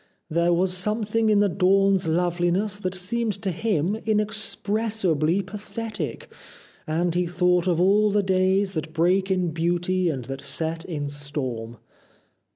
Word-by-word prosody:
There 170 +2 +2
was 180 +1 +1
something 215 +3 0
in 205 -1 +4
the 205 - +4
dawn's 195 0 +3
loveliness 175 +4 0
that 185 -2 -3
seemed 215 +4 -1
to 195 - 0
him 190 -1 0
inexpressibly 210 -5 0
pathetic, 215 +3 -6 0.5
and 165 +2 0
he 175 0 0
thought 180 0 +2
of 170 -2 +2
all 205 +4 +4
the 205 0 +2
days 190 +1 +2
that 155 -1 -4
break 185 +4 +2
in 185 -2 +1
beauty 175 +2 0
and 130 -6 -3
that 135 +1 -6
set 165 0 -3
in 150 -5 -4
storm." 130 -5 -5
185 Hz, 140 wpm, -24 LUFS, 165-205 Hz, 0.5 s, in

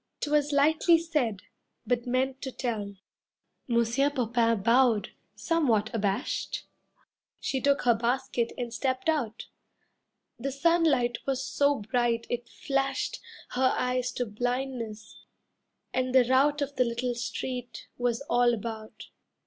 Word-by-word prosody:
'Twas 295 0 +1
lightly 310 +4 +4
said, 300 - -1 0.4
but 245 -1 0
meant 260 +2 0
to 265 - -4
tell. 215 -6 -3 0.7
Monsieur 235 +3 +2
Popain 230 -5 +1
bowed, 235 -2 +3 0.2
somewhat 245 -10 +1
abashed. 205 +1 -2 0.7
She 265 - -2
took 280 0 +2
her 245 -1 +5
basket 235 +1 -1
and 240 -2 -4
stepped 260 +4 -1
out. 240 -8 -1 0.9
The 275 +3 -2
sunlight 275 -5 +2
was 270 0 -1
so 285 0 +1
bright 235 +1 0
it 240 0 -3
flashed 275 -1 -1 0.3
Her 255 +1 +2
eyes 250 0 0
to 245 - -1
blindness, 245 -1 -4 0.7
and 255 0 0
the 255 -2 +7
rout 285 +4 +3
Of 285 0 -6
the 250 - +5
little 240 +1 -2
street 245 +1 -5
was 245 0 0
all 245 -3 +3
about. 215 -1 -7
250 Hz, 125 wpm, -28 LUFS, 235-275 Hz, 0.9 s, the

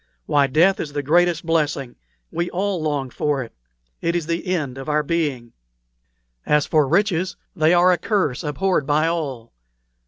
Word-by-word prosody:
Why, 140 -1 +3
death 170 +8 +3
is 145 - -5
the 145 -1 -2
greatest 170 +3 +2
blessing. 150 -6 -1 0.4
We 170 +2 -2
all 190 -1 -2
long 145 -4 -2
for 145 -1 -1
it; 115 - -13 0.5
it 170 +1 0
is 170 -3 -1
the 170 +3 -3
end 150 -8 -2
of 135 - -6
our 150 0 +1
being. 145 -7 -2 0.9
As 150 -1 +2
for 150 -3 +2
riches, 185 +1 +1 0.2
they 160 0 +3
are 180 +1 +5
a 180 - +1
curse, 190 - 0
abhorred 155 0 0
by 150 +1 +2
all. 145 -9 -3
155 Hz, 165 wpm, -21 LUFS, 145-175 Hz, 0.9 s, are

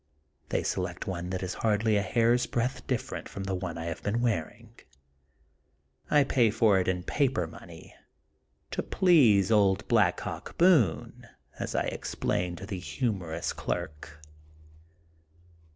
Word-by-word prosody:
They - - 0
select - - -3
one 90 -2 -4
that 95 0 -3
is 95 - -3
hardly 110 0 +2
a 100 - +3
hair's 120 +4 +2
breadth 125 +3 -2
dif 125 -3 0
f - - -13
erent - - -6
from 100 - -6
the 95 0 -3
one 90 -2 -4
I 80 - -5
have 85 0 -5
been 105 +3 -1
wearing. 110 -10 -2 1.4
I 150 -1 +5
pay 125 -4 +3
for 105 -2 +3
it 90 - -1
in 90 -1 -1
paper 130 - 0
money, 80 0 -12 0.8
to - - -1
please 120 - +4
old 100 -2 +3
Black 105 -7 +3
Hawk - - -7
B6one," 130 - +2 0.3
as - - -4
I - - +2
explain 90 0 -2
to 95 - -8
the 95 -3 -5
humorous 90 - -3
clerk. 75 0 -5
100 Hz, 150 wpm, -28 LUFS, 90-115 Hz, 1.4 s, I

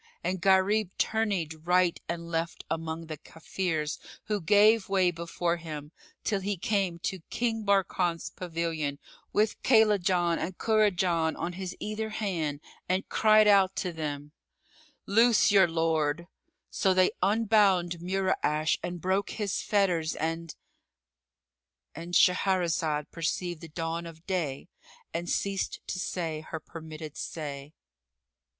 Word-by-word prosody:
And 180 +1 -2
Gharib 195 +2 +3
tourneyed 190 -8 -1
right 180 -1 +3
and 170 0 -4
left 165 0 -2
among 165 0 -3
the 155 -2 -7
Kafirs 160 -2 -3 0.2
who 210 -2 -2
gave 210 +3 +4
way 190 -2 +3
before 170 0 -2
him, 155 -3 -7 0.3
till 200 - 0
he 200 +1 -2
came 190 -2 0
to 190 - -2
King 225 -2 -1
Barkan's 185 -4 +1
pavilion, 165 -5 -3 0.3
with 210 +1 +1
Kaylajan 190 -7 +3
and 180 0 -4
Kurajan 185 -7 +2
on 175 - -3
his 185 0 -6
either 215 +1 -3
hand, 165 -9 -2 0.3
and 185 +1 0
cried 215 -1 +5
out 195 -2 +5
to 180 -2 -2
them, 150 -2 -5 0.7
"Loose 225 +1 +4
your 195 -3 +6
lord!" 165 -1 0 0.5
So 190 -1 +2
they 185 0 +4
unbound 195 -4 +3
Mura'ash 175 -4 0
and 175 0 -4
broke 190 +3 0
his 205 -3 -2
fetters 180 -6 +1
and——And 70 - -9
Shahrazad 170 -5 +2
perceived 170 0 -3
the 165 - -8
dawn 165 +1 -4
of 165 +1 -13
day 165 -7 -2 0.5
and 170 +1 -3
ceased 195 -1 -1
to 185 - -4
say 165 -4 -3
her 160 0 -6
permitted 155 -1 -9
say. 145 -2 -6
175 Hz, 125 wpm, -28 LUFS, 160-195 Hz, 0.7 s, your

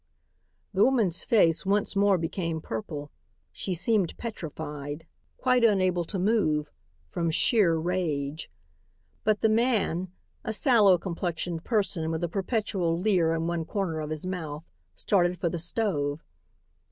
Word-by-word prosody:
The 195 +2 +4
woman's 225 -10 +2
face 170 -8 +3
once 200 +1 +1
more 200 -1 +4
became 165 -1 -2
purple. 145 +3 -6 0.4
She 185 - -3
seemed 195 0 0
petrified, 150 -7 -6 0.3
quite 255 -2 +2
unable 185 -5 +3
to 195 - -4
move, 180 -7 +1 0.4
from 170 -1 -1
sheer 175 +1 +3
rage. 160 -4 -2 0.7
But 215 -1 +1
the - - +4
man, 215 -6 +1 0.3
a 220 - -2
sallow 215 - +5
complexioned 170 -1 -3
person 195 -8 0
with 160 +1 -2
a - - +1
perpetual 190 -3 -1
leer 180 -4 +2
in 165 0 -2
one 170 -1 -1
corner 165 -2 -2
of 150 -1 -4
his 155 +2 -4
mouth, 160 -5 -4 0.3
started 180 -3 +1
for 170 - 0
the 170 - -3
stove. 165 -5 -1
175 Hz, 135 wpm, -27 LUFS, 160-205 Hz, 0.7 s, sallow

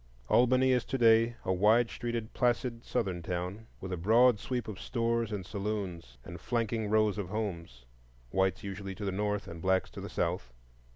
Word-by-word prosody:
Albany 130 +2 +4
is 125 -2 +2
to 135 - -2
day 115 0 +5
a 95 - +1
wide 110 +5 +4
streeted, 120 -2 -4
placid, 120 -1 0
Southern 95 -8 -2
town, 90 +5 -4
with 95 -1 -5
a - - -2
broad 115 +5 +5
sweep 125 +1 -3
of 105 -3 -7
stores 115 -2 -1
and 100 -3 -4
saloons, 100 -4 -4
and 85 -1 -9
flanking 115 +1 -1
rows 110 -1 +2
of 95 -3 -4
homes,—whites 60 - -4
usually 100 -1 -5
to 100 +2 -5
the 100 - 0
north, 105 +1 -1
and 85 0 -8
blacks 95 +1 +1
to - - -8
the - - -6
south. - - -2
105 Hz, 175 wpm, -31 LUFS, 95-115 Hz, -, day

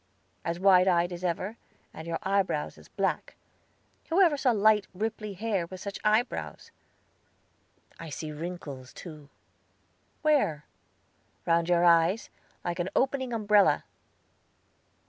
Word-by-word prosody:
"As 170 +1 -3
wide 185 -1 +5
eyed 175 -1 +2
as 175 +1 -8
ever, 185 +5 -2 0.4
and 160 +1 -9
your 165 -1 -1
eyebrows 190 -6 0
as - - -16
black. - - -2 0.7
Who 335 +4 +2
ever 345 -6 +5
saw 275 -2 +1
light, 215 -2 +4
ripply 215 0 -3
hair 195 -3 -2
with 185 +1 -9
such 200 +1 -6
eyebrows? 215 +4 0 1.3
I 165 - -7
see 155 +1 -5
wrinkles, 150 -5 -7
too." 155 -4 -11 0.9
"Where?" 270 - +2 0.8
"Round 170 0 +2
your 175 0 +4
eyes, 175 - +3 0.3
like 175 0 -2
an 175 +2 -1
opening 260 -1 +1
umbrella." 210 -3 +3
185 Hz, 125 wpm, -28 LUFS, 170-215 Hz, 1.3 s, wide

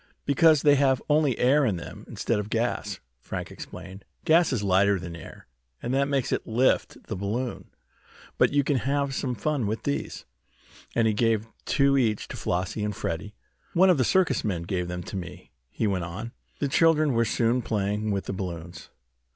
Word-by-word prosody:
"Because 155 +1 +4
they 145 - +6
have 135 -2 +3
only 150 -4 +3
air 140 +4 +4
in 110 -8 +1
them, 85 - -8
instead 115 -3 -1
of 105 0 -4
gas," 115 -3 -1 0.2
Frank - - -6
explained. 95 +1 -9 0.2
"Gas 165 0 +4
is 120 -6 -1
lighter 100 +1 +3
than 85 -1 -7
air, 80 - -11 0.3
and 120 - -3
that 140 +1 +2
makes 140 -3 0
it - - -1
lift 125 +3 +1
the - - -5
balloon. 110 +6 -3 0.7
But - - +5
you 145 0 +3
can 140 0 +1
have 140 +2 0
some 130 -1 -2
fun 135 0 -1
with 110 +1 -3
these," 70 -1 -3 0.7
and 115 - +3
he 110 - +3
gave 110 0 +1 0.2
two 140 -1 +3
each 110 -5 0
to - - -6
Flossie 90 +4 -2
and 105 -1 -2
Freddie. 105 +6 -4 0.4
"One 185 +2 +6
of 165 - +2
the - - +4
circus 155 -2 +2
men 90 -6 -2
gave 90 0 -2
them 90 0 -5
to - - -7
me," 85 -7 -8 0.2
he 110 - -2
went 95 -4 0
on. 110 +7 -6 0.3
The 145 - -1
children 155 0 +3
were 115 0 +3
soon 115 +2 +1
playing 105 -1 -1
with 100 -2 -1
the - - -3
balloons. 90 -3 -6
115 Hz, 190 wpm, -26 LUFS, 100-140 Hz, 0.7 s, they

